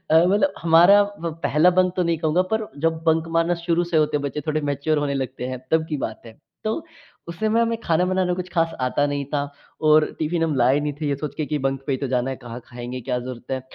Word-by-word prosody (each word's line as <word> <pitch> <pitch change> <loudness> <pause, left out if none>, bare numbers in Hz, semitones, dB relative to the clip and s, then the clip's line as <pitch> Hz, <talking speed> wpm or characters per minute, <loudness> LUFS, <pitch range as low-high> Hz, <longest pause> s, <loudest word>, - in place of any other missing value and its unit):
अ, 160 +2 +6
मतलब 205 +10 +2
हमारा 170 +5 +7 0.2
वो 170 0 -2
पहला 155 +5 +4
बंक 185 -1 +4
तो 185 - +2
नहीं 170 -1 0
कहूँगा 160 +3 +2
पर 220 -1 0
जब 165 +1 0
बंक 160 0 +2
मारना 165 +1 +2
शुरू 170 0 +1
से 170 -1 -2
होते 150 -1 +2
हैं 145 - -2
बच्चे 140 +1 -3
थोड़े 155 0 0
मैच्योर 145 +2 0
होने 145 -1 -1
लगते 130 -2 -3
हैं 130 0 -4
तब 160 0 +2
की 150 - -2
बात 110 - -10
है। 110 -1 -13 0.3
तो 215 0 0 0.5
उस 170 0 -7
समय 220 +1 +2
हमें 230 0 0
खाना 170 -3 +1
बनाना 185 -1 +1
कुछ 180 0 -5
ख़ास 165 -1 +1
आता 130 +3 +1
नहीं 145 -1 -2
था 145 0 -1 0.4
और 155 0 +6
टिफिन 165 +2 -1
हम 160 -2 0
लाए 130 +3 +4
नहीं 150 0 -2
थे 150 - -1
ये 140 - 0
सोच 145 0 -5
के 155 - -2
कि 150 0 -1
बंक 135 0 -2
पे 140 - 0
ही 130 - -1
तो 140 - -2
जाना 125 +1 0
है 135 - -4
कहाँ 120 0 -9
खाएँगे 125 0 -7
क्या 125 +1 -2
ज़रूरत 125 -1 -8
है 130 0 -1
155 Hz, 260 wpm, -23 LUFS, 135-170 Hz, 0.5 s, हमारा